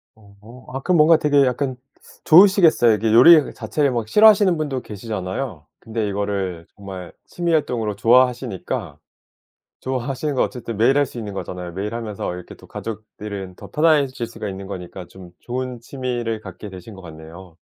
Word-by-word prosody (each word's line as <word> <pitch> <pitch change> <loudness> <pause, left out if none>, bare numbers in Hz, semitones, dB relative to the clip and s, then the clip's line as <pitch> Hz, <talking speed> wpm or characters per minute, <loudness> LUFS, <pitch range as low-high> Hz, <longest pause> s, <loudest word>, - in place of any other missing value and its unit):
어. 110 +4 -17
아 135 - -3
그럼 180 +4 +2
뭔가 160 +1 +6
되게 145 -2 +3
약간 130 +1 -1 0.5
좋으시겠어요 170 - +6
이게 110 +1 0
요리 150 +6 +7
자체를 135 +5 -1
막 120 -3 -2
싫어하시는 205 - +5
분도 145 -4 -3
계시잖아요. 100 - -6
근데 110 -1 -3
이거를 100 -4 -3
정말 95 -3 -9
취미 175 -1 -3
활동으로 115 -9 -1
좋아하시니까. 120 - +1 0.8
좋아하시는 130 +3 -3
거 130 - +2
어쨌든 120 -3 -4
매일 125 +6 +3
할 145 - +3
수 120 - -10
있는 105 -3 -6
거잖아요. 90 -2 -6
매일 100 +5 -5
하면서 110 -6 -4
이렇게 90 0 -10
또 - - -17
가족들은 105 -3 -7
더 - - -13
편해질 145 -6 +2
수가 110 -2 -7
있는 95 0 -7
거니까 90 -1 -8
좀 90 0 -14
좋은 125 0 -5
취미를 120 -3 -4
갖게 105 - -10
되신 95 +2 -11
것 95 - -12
같네요. 80 +1 -12
115 Hz, 380 characters per minute, -21 LUFS, 100-135 Hz, 0.8 s, 요리